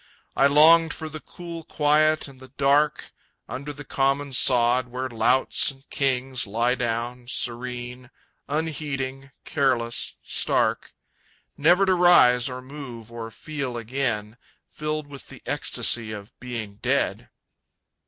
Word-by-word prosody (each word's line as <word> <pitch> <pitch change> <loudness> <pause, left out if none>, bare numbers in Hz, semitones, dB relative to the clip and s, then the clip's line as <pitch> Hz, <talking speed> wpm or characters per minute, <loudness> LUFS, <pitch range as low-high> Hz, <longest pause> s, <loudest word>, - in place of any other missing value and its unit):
I 140 - +5
longed 160 +3 +6
for 160 -1 -6
the 155 0 -7
cool 170 0 -9
quiet 155 +1 +2
and 135 -2 -14
the 130 - -12
dark, 140 +3 +1 0.4
Under 140 +3 -6
the 145 0 -10
common 135 +1 0
sod 125 0 +4
where 125 +2 -4
louts 125 +2 +2
and 135 0 -10
kings 130 -3 -1
Lie 115 +4 +1
down, 120 0 -3
serene, 125 0 -4 0.4
unheeding, 140 -3 -3 0.2
careless, 125 -5 0
stark, - - 0 0.6
Never 175 +6 +4
to 190 - +3
rise 140 -9 +5
or 125 0 -7
move 130 -5 -9
or 115 -1 -7
feel 140 0 -5
again, 115 -2 -3 0.3
Filled 155 0 -3
with 145 -1 -11
the 135 -3 -13
ecstasy 120 -4 +1
of 105 -1 -9
being 115 -5 -6
dead.... - - -1
130 Hz, 125 wpm, -24 LUFS, 120-145 Hz, 0.6 s, longed